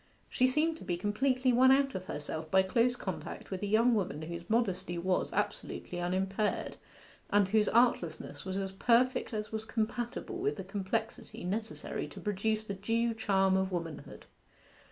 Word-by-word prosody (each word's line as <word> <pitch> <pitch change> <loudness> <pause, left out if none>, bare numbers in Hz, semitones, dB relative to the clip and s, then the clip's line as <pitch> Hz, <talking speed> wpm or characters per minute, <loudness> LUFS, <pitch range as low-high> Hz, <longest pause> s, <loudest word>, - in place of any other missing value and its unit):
She 255 - +4
seemed 310 +5 +1
to - - -11
be 175 - -2
completely 255 +6 +1
won 255 +2 +6
out 275 0 +4
of 185 -1 -5
herself 155 +1 -5
by 190 +3 +5
close 235 +6 +2
contact 190 -3 -6
with 190 - -3
a 205 - -1
young 230 +4 +4
woman 180 -8 -1
whose 170 +1 -7
modesty 190 -6 0
was 180 +2 0
absolutely 175 -1 -3
unimpaired, 190 +4 -1 0.5
and 205 -1 +4
whose 210 +1 +3
artlessness 175 -11 +1
was 190 0 -3
as 195 -1 -2
perfect 240 +7 +2
as 215 -1 -4
was 220 0 -3
compatible 235 +8 -3
with 410 +3 0
the 195 - -6
complexity 200 +3 -3
necessary 215 +5 -3
to - - -10
produce 215 +1 -1
the 205 - -4
due 230 +4 0
charm 195 -4 +2
of 190 0 +1
womanhood. 165 -3 -5
205 Hz, 165 wpm, -32 LUFS, 190-235 Hz, 0.5 s, won